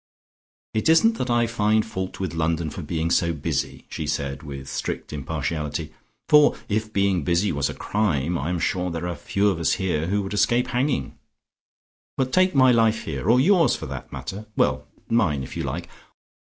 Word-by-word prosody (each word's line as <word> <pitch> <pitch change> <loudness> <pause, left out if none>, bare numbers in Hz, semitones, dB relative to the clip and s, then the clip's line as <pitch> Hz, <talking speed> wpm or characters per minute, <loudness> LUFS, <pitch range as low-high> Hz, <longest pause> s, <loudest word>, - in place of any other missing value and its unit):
"It 110 +8 +1
isn't 225 +8 +4
that 130 - -2
I 120 0 +3
find 110 -1 +1
fault 95 -3 -5
with 95 -2 -3
London 80 -1 -1
for 90 - -6
being 80 +1 -2
so 85 -1 +2
busy," 75 - -3
she 80 -2 -5
said 70 -1 -2
with 70 -3 -8
strict - - -4
impartiality, 75 +1 -3 0.3
"for 150 -1 +6
if 110 +1 -1
being 100 -5 +1
busy 85 +6 +1
was 70 -2 0
a - - -6
crime, 90 -7 0
I 80 0 -2
am 90 - 0
sure 90 +2 -1
there 85 +1 -4
are 90 - -3
few 100 +4 +1
of 95 -4 -1
us 85 - +2
here 85 -4 -1
who 100 +2 0
would 95 - -5
escape 120 +5 +2
hanging. 125 - -1 1.0
But 130 -1 -1
take 185 -1 +3
my 130 -1 +6
life 115 -2 +3
here, 80 +5 -3
or 120 +2 +6
yours 165 -2 +4
for - - -6
that - - -7
matter. 105 +3 -7
Well, 65 0 +1 0.2
mine 75 - +1
if - - -8
you - - -2
like. - - -4
95 Hz, 190 wpm, -24 LUFS, 80-115 Hz, 1.0 s, for